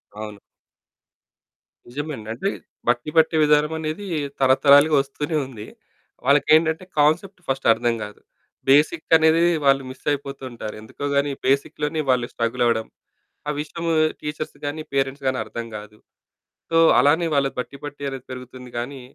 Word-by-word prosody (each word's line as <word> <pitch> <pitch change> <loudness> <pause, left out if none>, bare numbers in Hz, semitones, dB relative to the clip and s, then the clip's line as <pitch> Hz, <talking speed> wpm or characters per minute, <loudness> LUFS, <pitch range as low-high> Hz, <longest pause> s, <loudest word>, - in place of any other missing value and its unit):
అవును. 105 -1 -7 1.5
నిజమే 145 +5 -5
అండి. 110 -1 -10
అంటే 130 +12 -2 0.4
బట్టి 120 +4 +1
పట్టే 160 0 +4
విధానం 150 +1 +3
అనేది 160 +6 -4 0.3
తరతరాలుగా 140 +3 +5
వస్తూనే 145 +3 -3
ఉంది. 110 -5 -10 0.6
వాళ్ళకి 140 +1 +3
ఏంటంటే, 160 +2 +1 0.2
కాన్సెప్ట్ 175 +6 +2
ఫస్ట్ 135 0 -1
అర్థం 120 0 0
కాదు. 105 0 -9 0.5
బేసిక్ 155 +4 +3
అనేది 160 +1 +4 0.2
వాళ్ళు 135 0 +4
మిస్ 130 - -12
అయిపోతుంటారు. 135 -6 -5
ఎందుకో 110 +6 -7
గాని 140 0 +2 0.2
బేసిక్‍లోనే 150 +3 0
వాళ్ళు 125 -2 +3
స్ట్రగల్ 120 +1 -1
అవ్వడం. 115 -2 +1 0.6
ఆ - - +1
విషయము 165 +2 -4 0.3
టీచర్స్ 150 +1 -5
గాని, 145 +2 -3
పేరెంట్స్ 135 0 -1
గాని 130 -1 0
అర్థం 115 0 -6
కాదు. 105 0 -12 0.7
సో 165 - +1 0.2
అలానే 145 +6 +4
వాళ్ళ 140 -1 +2
బట్టి 125 +2 -5
పట్టి 145 -1 -8
అనేది 135 -1 -8
పెరుగుతుంది. 125 0 -10
కానీ 130 +3 -5
140 Hz, 140 wpm, -22 LUFS, 125-150 Hz, 1.5 s, తరతరాలుగా